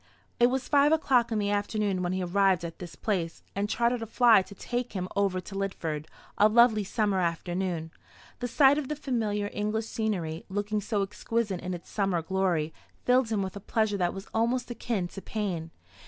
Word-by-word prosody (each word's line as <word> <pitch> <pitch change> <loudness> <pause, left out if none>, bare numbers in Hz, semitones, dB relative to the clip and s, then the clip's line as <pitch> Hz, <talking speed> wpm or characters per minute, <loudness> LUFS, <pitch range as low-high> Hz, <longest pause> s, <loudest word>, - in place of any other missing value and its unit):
It 240 - +7
was 260 +1 -1
five 290 0 +4
o'clock 255 -7 +3
in 220 - +1
the 205 -1 0
afternoon 205 -2 0
when 175 -1 -1
he 185 0 -1
arrived 185 -1 +2
at 165 - -7
this 175 -2 -8
place, 175 -6 -2
and 200 +1 -1
chartered 235 +1 +1
a 225 - -4
fly 230 -2 +6
to 200 +2 -11
take 245 +4 -3
him 185 -2 -2
over 195 -2 +1
to 195 - -11
Lidford 165 -6 -3 0.3
a 210 - +7
lovely 225 -1 +5
summer 205 -1 0
afternoon. 175 -1 -2 0.5
The 245 - -2
sight 275 +3 +5
of 285 - -4
the 300 - -2
familiar 215 -7 -1
English 210 +1 -1
scenery, 185 -8 -2
looking 205 +2 -1
so 205 -1 0
exquisite 205 0 -2
in 180 0 -3
its 175 - -12
summer 195 -5 0
glory, 175 -3 0 0.3
filled 250 -1 +4
him 210 -3 0
with 190 0 -5
a - - -5
pleasure 215 0 0
that 175 -2 +1
was 195 +1 -7
almost 240 +2 0
akin 225 -6 -2
to 195 - -8
pain. 185 -8 -3
205 Hz, 195 wpm, -28 LUFS, 185-230 Hz, 0.5 s, It